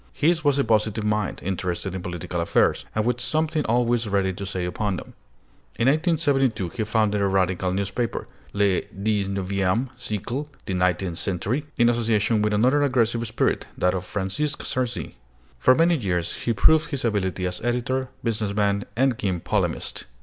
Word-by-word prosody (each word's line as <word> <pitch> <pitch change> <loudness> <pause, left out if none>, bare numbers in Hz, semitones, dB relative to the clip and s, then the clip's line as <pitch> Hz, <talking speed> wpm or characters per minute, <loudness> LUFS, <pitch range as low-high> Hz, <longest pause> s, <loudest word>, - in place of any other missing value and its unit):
His 165 +1 +2
was 145 -2 +3
a 140 - +3
positive 110 -1 +1
mind, 105 -1 -1
interested 90 0 -2
in 95 - -4
political 85 -1 -4
affairs, 85 - +2
and 110 0 +1
with 125 0 0
something 155 +3 0
always 120 0 +1
ready 95 -1 +1
to 100 +2 -6
say 95 -2 -3
upon 100 +2 -1
them. - - -8 0.6
In 115 +3 +1
1872 140 - +2
he 110 - -3
founded 105 -1 +1
a 100 - +3
radical 95 -1 +1
newspaper, 100 +5 -2 0.2
Le 100 -2 +2 0.2
XIXme 100 +2 0
Siècle 125 +4 -3 0.2
(The 95 - -3
Nineteenth 90 -1 0
Century), 110 - -2
in 120 -2 +5
association 115 -2 +2
with 105 0 +1
another 130 +7 +3
aggressive 120 -4 +1
spirit, 110 - 0
that 90 0 +2
of 95 -1 -2
Francisque 105 +11 -2
Sarcey. 125 -3 -3 0.4
For 130 - +5
many 165 +2 +4
years 90 - -1
he 115 - +2
proved 160 +9 +4
his 140 -4 -2
ability 95 -4 0
as 90 0 -3
editor, 125 +2 -1
business 105 -3 -1
man, 100 -1 +1
and 130 -1 +2
keen 95 -3 -1
polemist. - - -2
110 Hz, 165 wpm, -24 LUFS, 95-125 Hz, 0.6 s, in